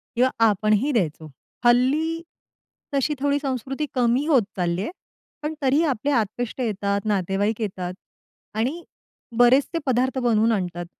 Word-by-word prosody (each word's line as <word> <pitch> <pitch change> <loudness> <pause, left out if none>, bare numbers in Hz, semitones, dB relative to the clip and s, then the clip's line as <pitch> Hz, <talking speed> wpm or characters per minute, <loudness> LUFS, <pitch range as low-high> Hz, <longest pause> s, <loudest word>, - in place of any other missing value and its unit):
किंवा 250 +2 +4 0.2
आपणही 215 +6 +2
द्यायचो. 160 - -1 0.4
हल्ली 290 +7 +3 0.7
तशी 280 +2 +1
थोडी 285 +1 +1
संस्कृती 270 +2 -3
कमी 250 +2 +2
होत 270 -9 +4
चालली 175 0 0
आहे 215 - -3 0.5
पण 300 - -2
तरीही 280 +4 +3
आपले 280 0 0
आप्तेष्ट 235 +1 -1
येतात, 200 -3 -1
नातेवाईक 205 +2 0
येतात 185 -3 -3 0.6
आणि 285 +10 -1 0.5
बरेच 250 +3 +5
ते 330 - 0
पदार्थ 260 +1 +1
बनवून 230 -2 +3
आणतात. 180 -4 -2
240 Hz, 130 wpm, -23 LUFS, 205-270 Hz, 0.7 s, बरेच